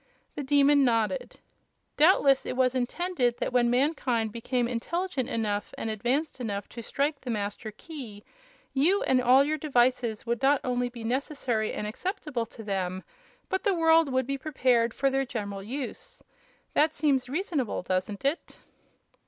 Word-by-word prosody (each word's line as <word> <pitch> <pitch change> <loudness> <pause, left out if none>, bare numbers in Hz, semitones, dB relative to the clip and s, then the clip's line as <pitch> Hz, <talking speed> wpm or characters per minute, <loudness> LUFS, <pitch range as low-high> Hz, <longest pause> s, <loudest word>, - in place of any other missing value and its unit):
The - - -4
Demon 285 +1 +4
nodded. 240 - 0 0.6
"Doubtless 290 -4 +5
it 255 - -3
was 255 -1 +3
intended 255 0 0
that - - -3
when 240 -1 +3
mankind 245 -4 +1
became 240 +2 -1
intelligent 270 +3 -2
enough 210 -4 -2
and 225 - -3
advanced 260 +8 -1
enough 205 -4 -3
to 235 - -8
strike 280 +5 -1
the 255 - -7
Master 210 0 -3
Key, 215 -3 -10 0.5
you 340 +9 +3
and 255 -1 +3
all 255 +2 +6
your 305 +2 -1
devices 245 -5 +1
would 235 0 -1
not 275 +1 +4
only 245 -1 0
be 235 -2 -9
necessary 245 -2 -1
and - - -4
acceptable 275 - -3
to 225 - -11
them, 190 -2 -2 0.4
but 380 - -2
the 400 -3 +2
world 325 -3 +4
would 260 0 +1
be 275 +1 -3
prepared 255 -6 +2
for 275 0 +1
their 270 0 +1
general 205 -6 -5
use. 275 - -7 0.5
That 310 +1 +3
seems 275 -4 +1
reasonable, 295 - -2
doesn't 190 +5 -2
it?" 290 +5 -2
255 Hz, 155 wpm, -28 LUFS, 230-290 Hz, 0.6 s, all